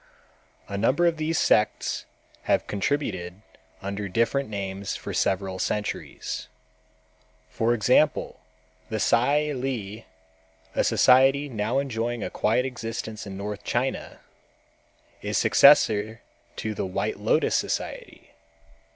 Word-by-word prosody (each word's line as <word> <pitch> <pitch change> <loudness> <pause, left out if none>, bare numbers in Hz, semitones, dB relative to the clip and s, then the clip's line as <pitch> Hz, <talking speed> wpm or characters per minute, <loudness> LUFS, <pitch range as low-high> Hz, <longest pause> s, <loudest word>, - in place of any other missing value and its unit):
A 100 -1 -4
number 130 +10 +2
of 170 -1 +2
these 160 +1 -1
sects 105 - +1 0.4
have - - +3
continued 100 -5 -2 0.4
under 100 0 -4
different 115 +6 0
names 100 -1 -4
for - - -6
several 95 -1 0
centuries. 105 +2 -3 1.0
For 115 +1 +1
example, 125 +7 +2 0.5
the 110 - -2
Tsai 145 +8 +2
Li, 115 -6 -4 0.7
a - - +1
society 135 +3 +4
now 110 +1 -1
enjoying 120 -4 -2
a - - -4
quiet 115 +4 +1
existence 115 -3 -5
in 95 -1 -7
North 100 0 -5
China, - - -2 1.0
is - - -1
successor 110 -5 +5 0.3
to 110 - -3
the 100 - -3
White 100 +3 -2
Lotus 110 +9 +2
society. - - -3
110 Hz, 110 wpm, -25 LUFS, 100-135 Hz, 1.0 s, successor